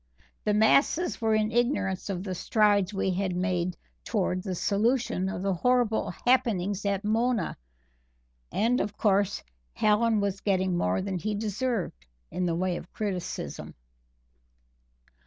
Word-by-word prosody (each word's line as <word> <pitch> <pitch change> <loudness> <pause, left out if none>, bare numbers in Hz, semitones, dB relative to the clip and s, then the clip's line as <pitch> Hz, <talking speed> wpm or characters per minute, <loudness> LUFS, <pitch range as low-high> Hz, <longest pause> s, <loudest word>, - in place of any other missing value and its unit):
The 210 - +2
masses 275 +9 +3
were 220 -1 +2
in 215 0 +1
ignorance 235 -6 0
of 185 -2 -3
the 190 -2 -3
strides 205 0 +2
we 195 -1 0
had 185 0 -1
made 180 -1 -1 0.3
twards 185 -3 -1
the 185 -2 -2
solution 205 -1 +1
of 185 - -4
the 195 -1 +1
horrible 245 +3 +1 0.2
happenings 205 -6 +2
at 200 0 0
Mona, 225 -2 +1 1.0
and, 240 +4 +2
of 205 0 -4
course, 200 -1 +1 0.3
Hallen 215 +1 +3
was 200 -1 -1
getting 190 -2 +1
more 90 - 0
than 190 -2 -3
he 215 +3 -2
deserved 210 - -2 0.2
in 180 0 -1
the 165 - 0
way 180 0 0
of - - -10
criticism. 195 -5 -4
200 Hz, 140 wpm, -28 LUFS, 185-220 Hz, 1.0 s, masses